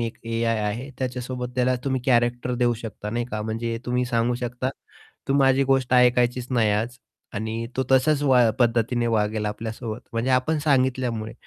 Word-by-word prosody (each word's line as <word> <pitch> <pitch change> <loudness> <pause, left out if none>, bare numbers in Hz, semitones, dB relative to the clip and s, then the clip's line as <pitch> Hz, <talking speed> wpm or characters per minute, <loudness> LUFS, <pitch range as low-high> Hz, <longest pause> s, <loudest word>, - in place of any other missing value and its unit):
एक 115 -1 -3
AI 115 0 0
आहे, 120 +7 -4
त्याच्यासोबत 125 -1 -4
त्याला 125 0 +2
तुम्ही 130 -2 0
कॅरेक्टर 120 0 +2
देऊ 120 -1 +2
शकता 105 -2 -6
नाही 120 +2 -1
का. 105 0 -3
म्हणजे 115 +1 -3
तुम्ही 125 0 +1
सांगू 120 0 0
शकता. 125 +2 -2 0.6
तू 135 - +2
माझी 135 -1 +4
गोष्ट 135 -2 +1
ऐकायचीच 125 0 +3
नाही 115 -4 +2
आज 115 +4 -1 0.4
आणि 110 +2 -3
तो 130 - +2
तसाच 140 +3 +3
वा 125 -5 +5
पद्धतीने 120 0 +2
वागेल 105 -1 0
आपल्यासोबत, 110 +2 -5
म्हणजे 115 +3 -1
आपण 130 +5 +2
सांगितल्यामुळे. 130 -6 0
120 Hz, 160 wpm, -24 LUFS, 115-130 Hz, 0.6 s, वा